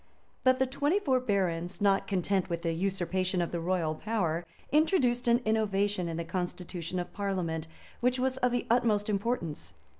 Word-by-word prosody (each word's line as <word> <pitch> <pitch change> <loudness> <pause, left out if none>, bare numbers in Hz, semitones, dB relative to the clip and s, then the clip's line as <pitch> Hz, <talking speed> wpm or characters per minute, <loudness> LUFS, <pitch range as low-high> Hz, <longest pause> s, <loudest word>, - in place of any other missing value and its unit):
But 255 -1 +5
the 265 - +3
twenty 285 +7 +1
four 265 -10 +2
barons, 185 -7 -1
not 200 -1 +3
content 190 -1 0
with 170 0 -3
the 165 -1 0
usurpation 185 +1 -1
of 170 - -1
the 170 - -2
royal 165 -2 0
power, 170 -3 -1 0.2
introduced 275 -6 +3
an 235 +1 +4
innovation 205 -4 +1
in 165 - -3
the 170 - -3
constitution 180 0 -4
of 175 - -4
parliament, 175 -5 -2 0.3
which 250 +1 +2
was 260 0 0
of 250 -1 +2
the 245 - 0
utmost 220 -3 +2
importance. 170 - -2
195 Hz, 170 wpm, -30 LUFS, 175-240 Hz, 0.3 s, But